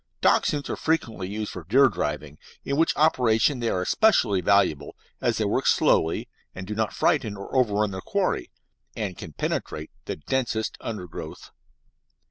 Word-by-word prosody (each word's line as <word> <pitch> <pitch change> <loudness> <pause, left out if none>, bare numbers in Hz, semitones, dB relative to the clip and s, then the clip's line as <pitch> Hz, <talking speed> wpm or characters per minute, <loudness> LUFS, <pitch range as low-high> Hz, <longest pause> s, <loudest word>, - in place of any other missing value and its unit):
Dachshunds 145 -2 +2
are - - -2
frequently 120 - -1
used 105 +1 -4
for 90 - -7
deer 130 - +5
driving, 75 - -4 0.3
in 140 - -1
which 165 +3 +2
operation 125 -3 +3
they 115 -1 0
are 90 - 0
especially 115 - +3
valuable, 90 -7 +2 0.3
as - - +1
they - - 0
work - - 0
slowly, 80 - +2 0.3
and 95 - -6
do 105 - -4
not 110 0 -1
frighten 105 -2 +1
or 100 +6 -8
overrun 105 -5 +2
their 95 0 -5
quarry, - - -1 0.5
and 100 -5 -3
can 80 - -9
penetrate 75 +1 -3
the - - -3
densest 115 - -2
undergrowth. 90 -8 -7
105 Hz, 155 wpm, -25 LUFS, 90-125 Hz, 0.5 s, deer